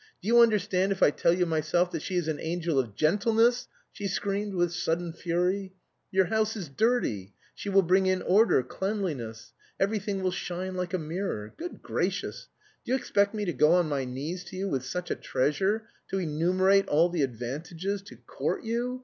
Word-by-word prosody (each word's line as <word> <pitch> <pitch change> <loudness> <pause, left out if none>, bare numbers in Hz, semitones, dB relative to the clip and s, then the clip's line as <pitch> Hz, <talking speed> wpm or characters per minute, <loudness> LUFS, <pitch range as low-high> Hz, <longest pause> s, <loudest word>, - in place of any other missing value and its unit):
Do 195 - -9
you 235 +1 +6
understand 205 -4 +3
if 195 - +1
I - - +6
tell 170 - +2
you 180 +1 +2
myself 165 +2 +1
that - - -3
she 185 - -4
is 175 -3 0
an 155 -2 -2
angel 165 -3 -1
of 115 -6 -2
gentleness!" 225 - +3 0.2
she 205 - -4
screamed 200 +1 -2
with 175 -1 +1
sudden 170 0 -1
fury. 180 +3 -1 0.3
"Your 190 0 +3
house 220 +4 0
is 175 -7 -6
dirty, 135 - 0 0.2
she 205 - -6
will 195 0 +5
bring 190 +2 +3
in 185 0 +1
order, 200 - +4
cleanliness. 130 - -4 0.3
Everything 200 -1 -1
will 185 - +1
shine 180 +1 -4
like 180 -1 -2
a - - +1
mirror. 155 - -4
Good 350 +2 -8
gracious, - - -2 0.3
do - - -5
you - - +4
expect 200 -4 +1
me 210 -1 -2
to 175 - -1
go 150 +4 +4
on 175 -3 +3
my 140 -2 0
knees 145 +8 -5
to 175 - -10
you 195 +2 -2
with 135 -8 -1
such 180 +7 -4
a - - +1
treasure, 190 +11 0 0.2
to 195 - -1
enumerate 185 +4 +2
all 165 +4 +4
the 170 -3 -1
advantages, 155 - -3
to 200 - -13
court - - -3
you! 240 +3 -2
180 Hz, 190 wpm, -28 LUFS, 160-200 Hz, 0.3 s, you